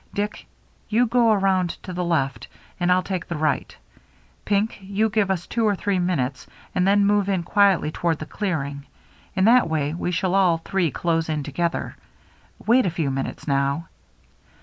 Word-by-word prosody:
Dick, 205 +1 -3 0.4
you 235 +3 +3
go 235 -1 +3
around 190 -3 +2
to 185 - -7
the 180 0 -2
left, 135 -8 -1 0.3
and 175 0 +2
I'll 185 0 +3
take 185 -3 -4
the 170 - -4
right; 155 0 -1 0.7
Pink, 210 +2 0
you 200 +3 0
give 210 -2 +1
us 180 -3 -1
two 230 - -1
or 210 -2 +3
three 195 0 -1
minutes 140 -8 -1 0.3
and 180 +1 +1
then 200 0 +4
move 205 -1 +2
in 190 -3 0
quietly 195 -4 +3
toward 165 0 -1
the 155 - -6
clearing. 145 -8 -3 0.5
In 190 - +3
that 240 -4 +5
way 150 -2 -1
we 175 - -3
shall 180 +1 0
all 185 -4 +4
three 175 +1 -1
close 165 +2 -1
in 155 -2 -1
together. 170 +5 -3 0.7
Wait 240 -1 +4
a - - +2
few 160 -4 -2
minutes 135 +2 -4
now." 140 +3 0
180 Hz, 175 wpm, -23 LUFS, 160-200 Hz, 0.7 s, that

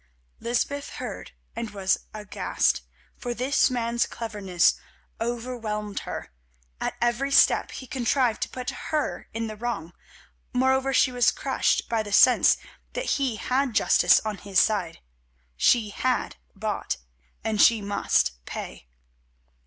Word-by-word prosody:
Lysbeth 280 +4 -2
heard - - -7 0.2
and 230 -1 -4
was 195 -2 0
aghast, 210 - 0 0.4
for 240 -1 -4
this 260 +4 +2
man's 235 -1 0
cleverness 200 -6 +1 0.5
overwhelmed 230 -3 -3
her. - - -6 0.5
At - - -2
every 240 +3 +1
step 275 - +4
he 260 - -8
contrived 255 -3 0
to - - -1
put 255 -1 -4 0.2
her 305 -2 -2
in 225 +1 -3
the 215 -1 -6
wrong; 210 -7 -4 0.6
moreover 265 +1 +2
she 265 -1 +4
was 245 -1 +4
crushed - - 0
by 230 -2 0
the 205 -1 -7
sense 245 +5 +6 0.4
that - - -1
he 260 -5 0
had 255 +1 -1
justice - - +5
on 215 -2 -4
his 195 -2 +1
side. 195 -6 +1 0.5
She 220 - +3
had 255 +4 -1 0.2
bought 210 +1 -2 0.5
and 220 -1 +1
she 230 -2 +6
must 75 - 0
pay. - - -7
230 Hz, 130 wpm, -26 LUFS, 210-255 Hz, 0.6 s, sense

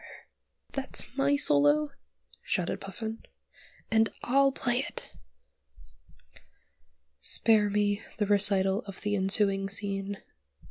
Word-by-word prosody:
"That's 270 -2 -2
my 280 +1 +2
solo," 145 - +4 0.5
shouted 180 -2 -2
Puffin; 220 +3 -6 0.7
"and 220 0 +3
I'll 275 +2 +3
play 245 -2 -1
it!" - - -6 2.1
Spare 210 - +2
me 205 0 0 0.2
the 210 - 0
recital 200 -1 +3
of 195 - -9
the 205 0 -1
ensuing 195 0 +1
scene. 200 0 -2
205 Hz, 95 wpm, -28 LUFS, 195-225 Hz, 2.1 s, solo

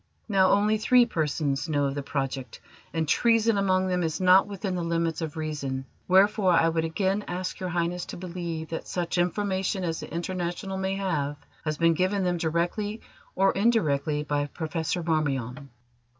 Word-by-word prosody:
Now, 195 -3 +4
only 210 +2 +3
three 245 +2 +5
persons 155 - -1
know 145 -2 +1
of 135 - -1
the 145 - -3
project, 135 -2 -4 0.3
and 160 -2 -1
treason 230 +5 +3
among 190 -2 +2
them 180 -1 0
is 160 -2 -1
not 185 +1 +6
within 200 -1 -4
the 180 - -2
limits 165 -1 -1
of 160 -1 -4
reason, 140 -4 -3 0.2
wherefore 190 0 +4
I 165 0 +4
would 165 0 0
again 190 +5 0
ask 180 +1 -4
Your 185 - -3
Highness 175 0 -1
to - - -7
believe 170 -3 -5
that 165 - -5
such 175 0 -2
information 190 +1 0
as 165 -2 -2
the - - -8
International 175 +3 -3
may 190 0 -1
have 145 -7 -1 0.3
has 155 -1 -1
been 165 +1 +4
given 185 +4 +1
them 180 -1 +1
directly 175 +7 -1 0.3
or 195 +1 +4
indirectly 155 -9 +1
by 145 -1 -1
Professor 160 +2 -3
Marmion." 140 -4 -1
175 Hz, 170 wpm, -27 LUFS, 155-190 Hz, 0.3 s, not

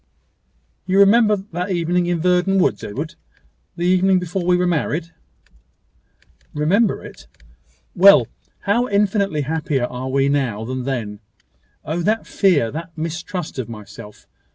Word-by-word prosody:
"You 190 +1 +1
remember 210 +2 +5
that 190 -1 -5
evening 175 0 0
in 175 -1 0
Verdon 180 +2 +2
woods, 110 - +1
Edward 145 +9 -5 0.6
the 170 - -3
evening 185 +1 +3
before 180 +1 -3
we 180 0 +3
were 180 - +1
married?" 170 0 -1 1.4
"Remember 190 +9 +1
it!" - - -13 0.7
"Well. 200 +2 +7 0.4
How 235 +5 +1
infinitely 200 -5 +1
happier 150 -3 -1
are 125 +1 -6
we 135 +1 +1
now 130 -7 -1
than 130 +1 -4
then! 115 -6 -4 0.7
Oh! 160 +3 -2
that 215 +5 0
fear 155 - +2
that 165 +2 -8
mistrust 165 0 -5
of 120 -3 -4
myself! 105 -1 -11
170 Hz, 130 wpm, -20 LUFS, 140-190 Hz, 1.4 s, Well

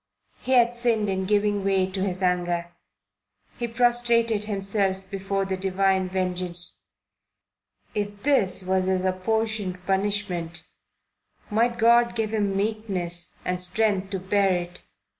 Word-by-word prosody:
He 260 - -1
had 240 -1 +5
sinned 235 -4 0
in 190 0 -1
giving 205 -1 +1
way 195 -1 +2
to 190 0 -3
his 185 -1 -2
anger. 175 -1 0 0.9
He 240 - -1
prostrated 235 -2 +2
himself 195 -2 -1
before 195 0 -2
the 190 0 -2
divine 190 0 +1
vengeance. 180 -1 -2 1.1
If 205 -1 -4
this 200 -10 +2
was 185 0 +1
his 185 0 0
apportioned 205 0 -1
punishment, 190 -4 -1 0.9
might 235 +2 +2
God 235 +1 +4
give 220 -1 -1
him 200 -3 0
meekness 195 -5 -2
and 180 0 -1
strength 195 +1 0
to 195 -1 -3
bear 195 +1 +2
it. 175 0 -5
195 Hz, 125 wpm, -25 LUFS, 185-220 Hz, 1.1 s, had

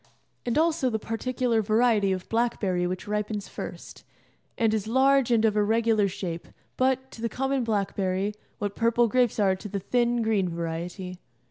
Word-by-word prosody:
And 240 - +1
also 320 -4 +2
the 220 - -1
particular 230 +1 -1
variety 215 -1 +3
of 185 -1 -3
blackberry 200 -6 0
which 185 +3 -5
ripens 210 0 -2
first, - - -8 0.5
and 225 -2 +2
is 215 -1 -1
large 265 +2 +4
and 225 -2 +3
of 215 -1 +2
irregular 220 0 +3
shape, 180 -3 -5 0.3
but, 260 0 +1
to 225 - -11
the 230 - -1
common 270 +1 -1
blackberry, 200 -2 -1 0.2
what 205 -1 -3
purple 235 +1 +3
grapes 245 -1 +2
are 195 -2 +3
to 205 +3 -8
the 200 - -2
thin, 240 +3 +1
green 210 -5 +1
variety. 170 +2 -5
220 Hz, 160 wpm, -26 LUFS, 195-240 Hz, 0.5 s, large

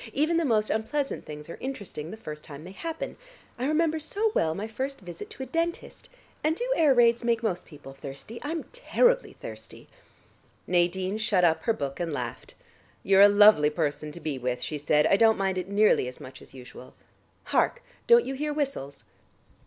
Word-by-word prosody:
Even 310 +4 +2
the 335 - +1
most 215 -5 +1
unpleasant 270 +6 -2
things 150 0 -8
are - - -9
interesting 200 - -6
the 220 - -8
first 150 -7 -8
time 145 0 -10
they 180 - -10
happen. 325 +10 -6 0.4
I 255 - 0
remember 315 +1 +1
so 405 +8 -1
well 160 0 +1
my 210 +4 -4
first 265 +5 -4
visit 175 -3 -9
to 265 - -7
a - - -5
dentist. 335 +4 -3 0.3
And 310 +1 +2
do 485 +7 -3
air 310 -4 +4
raids 235 0 +4
make 235 -1 +1
most 185 -5 -2
people 145 -4 -12
thirsty, 140 +11 -9
I'm 320 +2 -3
terribly - - +2
thirsty." - - -10 0.8
Nadine 185 +3 0
shut 215 -4 +2
up 165 -2 +3
her 225 - +3
book 140 -7 -5
and 170 -2 -2
laughed. 125 -5 -6 0.5
"You're 195 0 +5
a 205 - +9
lovely 205 -7 +6
person 150 -1 -2
to 170 - -8
be 150 -4 -4
with," 125 0 -2
she 150 - -4
said. 150 +1 +3
"I 195 - +4
don't 225 +1 +5
mind 190 -1 0
it 185 +1 -6
nearly 205 -9 +3
as 125 - -7
much 130 - -11
as - - -14
usual. 125 0 -12 0.5
Hark, - - 0 0.2
don't 475 0 +6
you 270 - -3
hear 295 +2 -2
whistles?" 265 - -3
205 Hz, 190 wpm, -27 LUFS, -, 0.8 s, a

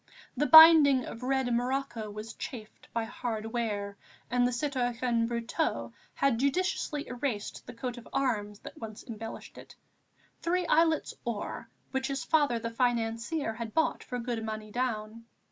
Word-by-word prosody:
The 295 +3 +1
binding 315 -5 +9
of 230 - -8
red 260 -1 0
morocco 245 -2 -1
was 215 +2 -7
chafed 220 -5 -9
by 230 - -1
hard 225 -1 -4
wear, 210 -3 -3 0.3
and 245 0 +3
the - - -1
citoyen 245 -3 0
Brotteaux 235 +7 -2 0.2
had 270 -5 +2
judiciously 295 0 0
erased 245 -4 -4
the 245 - -8
coat 245 +1 -4
of 235 - -14
arms 210 -6 -1
that - - -10
once 215 -1 -7
embellished 225 -3 -8
it, - - -14 0.7
three 360 +1 0
islets 325 -1 +2
or, 235 -4 -4 0.2
which 265 0 -1
his 275 -1 -3
father 290 -6 +2
the 230 0 -4
financier 230 +2 0
had 225 -1 -7
bought 320 - +1
for 250 - -5
good 235 -2 -3
money 215 -1 -5
down. 230 -2 -3
240 Hz, 150 wpm, -30 LUFS, 225-275 Hz, 0.7 s, binding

